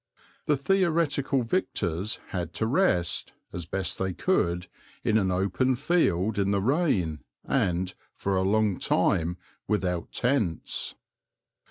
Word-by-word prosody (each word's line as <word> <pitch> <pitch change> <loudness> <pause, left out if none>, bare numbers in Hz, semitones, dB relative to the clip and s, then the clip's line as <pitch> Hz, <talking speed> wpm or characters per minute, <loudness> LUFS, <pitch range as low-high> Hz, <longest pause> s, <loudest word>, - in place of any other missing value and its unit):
The 150 - +3
theoretical 155 -5 +1
victors 105 - -1
had 85 -3 -3
to 110 - 0
rest, 115 - +1 0.2
as 85 -2 -5
best 95 +2 -2
they 95 -1 -1
could, 90 - +1 0.4
in 110 -2 +3
an 95 -2 +1
open 95 +8 +1
field 110 - +1
in 100 0 +2
the 100 0 +2
rain 105 - +1 0.3
and, 95 -7 0 0.2
for 100 -1 -1
a 95 - +2
long 105 0 +2
time, 85 +2 +1 0.3
without 90 -5 -1
tents. 120 - -1
100 Hz, 125 wpm, -27 LUFS, 90-135 Hz, 0.4 s, The